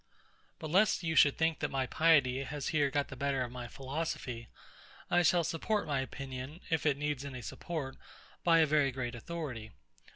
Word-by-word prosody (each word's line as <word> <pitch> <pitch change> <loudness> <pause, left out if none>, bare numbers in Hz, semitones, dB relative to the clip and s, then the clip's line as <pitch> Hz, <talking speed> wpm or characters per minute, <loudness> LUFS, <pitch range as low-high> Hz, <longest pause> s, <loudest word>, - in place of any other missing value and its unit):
But 155 - -6
lest 190 +1 +4
you 160 -1 -1
should 145 -1 +6
think 160 0 +1
that - - -1
my 135 -1 0
piety 140 -4 +3
has 145 +1 -4
here 145 -4 +2
got 145 0 -1
the - - -7
better 135 0 0
of 120 - -6
my 125 -1 -6
philosophy, 130 -3 -4 0.6
I 175 - +5
shall 175 0 +4
support 205 +7 -1
my 140 -3 0
opinion, 135 +3 -6
if 160 -1 +1
it 140 -2 +2
needs 150 -2 -2
any 130 -3 -7
support, 145 +1 -5 0.5
by 165 -1 +5
a - - +6
very 150 -2 +3
great 125 -1 -4
authority. 125 -4 -5
140 Hz, 185 wpm, -32 LUFS, 130-160 Hz, 0.6 s, should